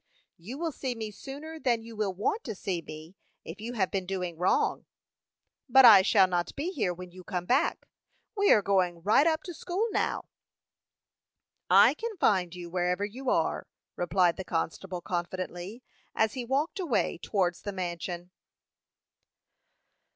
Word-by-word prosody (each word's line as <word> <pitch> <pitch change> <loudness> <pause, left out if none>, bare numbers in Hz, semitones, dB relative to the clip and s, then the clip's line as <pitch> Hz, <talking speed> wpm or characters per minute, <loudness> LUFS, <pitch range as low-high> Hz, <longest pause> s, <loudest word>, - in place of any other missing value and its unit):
"You 220 +11 -8
will 330 +1 -2
see 260 -3 -4
me 220 -2 -5
sooner 295 +8 -9
than 235 -5 0
you 230 0 -10
will 210 -2 -1
want 210 - -2
to 220 - -4
see 180 -2 -3
me, 155 +3 -11 0.3
if 180 +6 -8
you 235 +3 -5
have 195 -6 0
been 190 -2 -2
doing 180 -3 -3
wrong." 180 +3 +1 0.8
"But 265 +1 +8
I 210 -5 +10
shall 195 0 +5
not 175 -1 -2
be 320 +6 -2
here 235 - -1
when 180 0 -9
you 185 +1 -12
come 180 -2 -4
back. 265 - +1 0.5
We 405 -1 +3
are 210 - +5
going 180 -4 +1
right 220 - +4
up 320 -1 +1
to 355 - -7
school 375 +7 -2
now." - - -1 1.4
"I - - +7
can 455 -3 -6
find 185 - +2
you, 175 -1 -7
wherever 180 +2 0
you 250 +6 -5
are," - - 0 0.3
replied 175 -1 +2
the 190 - -4
constable, 180 +2 -3
confidently, 180 +5 -5 0.3
as 220 -1 +2
he 255 -2 -4
walked 280 +9 -1
away 290 - 0
towards 180 -4 -1
the 205 - -4
mansion. 175 -1 -5
195 Hz, 160 wpm, -29 LUFS, 180-255 Hz, 1.4 s, I